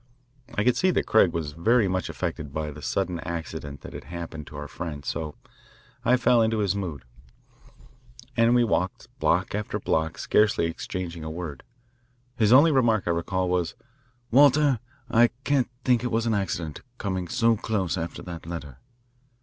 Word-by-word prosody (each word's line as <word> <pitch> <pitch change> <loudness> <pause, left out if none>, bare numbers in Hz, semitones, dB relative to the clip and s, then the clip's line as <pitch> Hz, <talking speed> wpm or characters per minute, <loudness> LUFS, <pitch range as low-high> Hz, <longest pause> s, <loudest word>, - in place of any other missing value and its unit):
I 105 - +1
could 125 +1 +3
see 185 - +3
that 180 - +1
Craig 105 -5 +5
was 80 -3 -3
very 110 +8 +3
much 95 -1 -1
affected 75 -2 -4
by 75 +1 -3
the 75 +1 -10
sudden 90 +5 -1
accident 80 -4 -6
that - - -10
had - - -8
happened 85 -3 -7
to - - -11
our 75 0 -6
friend, 75 -3 -6
so 75 -2 -3 0.7
I 125 +2 +4
fell 120 -1 +4
into 110 0 +2
his 100 -3 +1
mood, 85 -10 -4 1.3
and 115 +1 +4
we 120 - +5
walked 95 -5 -1
block 90 +3 +1
after 105 0 -2
block 80 0 0
scarcely 105 -5 +3
exchanging 85 0 -4
a 80 - -4
word. 80 -4 -6 0.7
His 110 -3 +3
only 145 +6 +8
remark, 115 -7 +3
I - - +3
recall, 90 +2 -1
was, 90 -2 0 0.6
"Walter, 140 0 +5 0.3
I 120 0 +5 0.2
can't 135 -4 +2 0.2
think 125 -2 +3
it 125 - 0
was 115 +1 +1
an 115 - +1
accident, 90 -6 -2 0.2
coming 95 -5 -2
so 115 +4 +3
close 100 -5 -1
after 85 -2 -5
that 85 -2 -8
letter." 75 -6 -7
95 Hz, 170 wpm, -26 LUFS, 80-115 Hz, 1.3 s, only